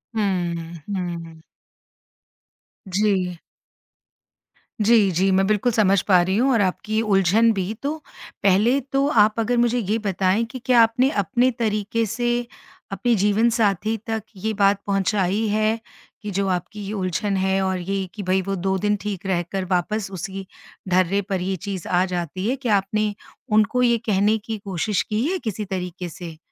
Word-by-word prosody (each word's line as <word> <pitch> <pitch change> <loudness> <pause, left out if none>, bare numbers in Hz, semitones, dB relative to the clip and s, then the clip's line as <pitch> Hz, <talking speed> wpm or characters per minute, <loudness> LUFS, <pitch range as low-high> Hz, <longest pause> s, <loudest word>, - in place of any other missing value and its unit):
हुँ, 175 -5 -1 0.2
हुँ। 170 -4 -5 1.5
जी। 185 -3 0 1.4
जी, 210 -3 +4
जी। 190 +3 +2
मैं 190 +1 +3
बिल्कुल, 215 +3 +2
समझ 200 -4 +3
पा 185 -3 +4
रही 190 +2 0
हूँ 265 +3 +3
और 230 -5 +3
आपकी 215 +3 0
उलझन 210 +2 +3
भी। 195 +1 -2
तो 295 +3 -2 0.5
पहले 210 +8 +4
तो 275 +1 +2 0.2
आप 215 +1 0
अगर 235 +2 +1
मुझे 240 0 +2
ये 215 +1 0
बताएँ 190 +3 +1
कि 255 - -6
क्या 245 -2 +5
आपने 230 +4 +3
अपने 245 +8 +2
तरीके 215 0 0
से 240 +3 -1 0.6
अपने 235 +5 +1
जीवनसाथी 215 0 +2
तक 225 -2 -2
ये 220 +4 -2
बात 200 -1 +2
पहुँचाई 195 +1 +1
है? 215 +2 +1 0.4
कि 210 -2 -5
जो 195 +1 -1
आपकी 185 +3 -3
ये 205 - -5
उलझन 195 +1 -1
है 190 0 +1
और 190 0 0
ये 195 +1 -2
कि 205 - -6
भई 185 +1 +1
वो 195 +1 -3
2 190 +1 -1
दिन 210 +1 +1
ठीक 200 -2 -5
रहकर 185 0 -1
वापस 195 +3 0
उसी 190 +1 -5 0.4
ढर्रे 185 +2 +2
पर 190 -2 -1
ये 190 +1 -1
चीज़ 190 -1 -6
आ 180 +1 +2
जाती 180 +2 -3
है? 265 - +1
क्या 245 -6 +1
आपने 210 +2 -1 0.4
उनको 215 +4 +3
ये 235 -1 +4
कहने 210 +1 +2
की 220 +1 -5
कोशिश 200 -1 -1
की 215 +3 -2
है 380 - 0
किसी 215 -1 -3
तरीके 180 -2 -5
से? 165 -1 -9
200 Hz, 165 wpm, -22 LUFS, 185-220 Hz, 1.5 s, क्या